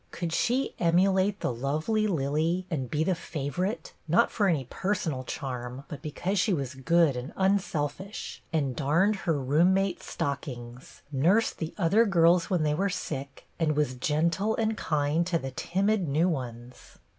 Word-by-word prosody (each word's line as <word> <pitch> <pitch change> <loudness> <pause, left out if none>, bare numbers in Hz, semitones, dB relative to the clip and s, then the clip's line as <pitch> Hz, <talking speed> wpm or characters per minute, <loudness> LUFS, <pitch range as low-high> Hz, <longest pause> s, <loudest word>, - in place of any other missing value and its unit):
Could 170 -2 -4
she 250 +9 +1
emulate 190 +3 +3
the - - 0
lovely 155 - 0
Lillie, 160 +2 0
and 135 -6 -2
be 155 +1 0
the 185 - +2
favorite, 170 - -3
not 175 +9 +3
for 205 -3 +1
any 155 -8 +1
personal 165 -7 -2
charm, 125 0 -5
but 145 - -7
because 175 +5 -2
she 185 +3 +2
was 140 -5 -2
good, 155 +2 +3
and 125 +5 -5
unselfish, 190 -1 -1
and 140 -6 0
darned 165 +9 +2
her 160 -4 +2
roommate's 175 +8 +2
stockings, 125 -3 -5
nursed 175 +12 +2
the 160 0 -4
other 210 +5 +4
girls 170 -2 +4
when 180 -4 +1
they 150 -1 +2
were 195 +6 +1
sick, 135 -6 -5
and 155 -2 +1
was 150 -4 +1
gentle 170 - 0
and 220 -1 0
kind 155 0 0
to 175 -2 +1
the 135 -4 -5
timid 195 +6 0
new 155 +5 +2
ones? 125 -6 -6
165 Hz, 155 wpm, -28 LUFS, 140-190 Hz, -, other